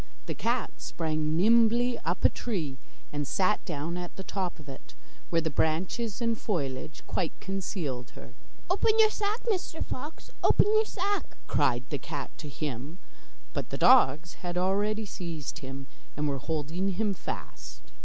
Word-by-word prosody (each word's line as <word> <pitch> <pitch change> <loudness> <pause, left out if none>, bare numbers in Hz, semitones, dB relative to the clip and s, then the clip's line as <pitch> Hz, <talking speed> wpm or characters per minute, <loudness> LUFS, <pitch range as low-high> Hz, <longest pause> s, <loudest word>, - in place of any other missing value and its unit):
The - - -2
cat - - 0
sprang 155 -1 -1
nimbly 235 +4 +5
up 175 +2 0
a - - +9
tree, 165 - -2 0.4
and 145 -1 -1
sat 195 +7 +2
down 165 0 -2
at 175 -1 -5
the 190 - -6
top 185 -2 -2
of 155 -3 -13
it, 135 -1 -10 0.3
where 165 -1 +2
the 160 - 0
branches 185 +9 0
and 230 -1 +2
foliage 155 - -3
quite 170 -4 -1
concealed 170 - -3
her. 125 - -10 0.3
'Open 425 +4 +3
your 435 -1 +7
sack, 425 +2 -1
Mr 370 -7 -1
Fox, 295 +5 -6
open - - +6
your 435 0 +5
sack,' 405 0 -2
cried 120 +1 +2
the 145 - -1
cat 145 +1 -5
to 150 - -6
him, 145 +2 -4 0.6
but - - -3
the - - -3
dogs 170 - +6
had 175 0 -3
already 205 +4 +1
seized 170 -6 -5
him, 135 -2 -6 0.3
and 150 0 +1
were 140 -2 -1
holding 160 +6 -1
him 205 +2 +1
fast. 185 - -7
175 Hz, 160 wpm, -29 LUFS, 150-220 Hz, 0.6 s, a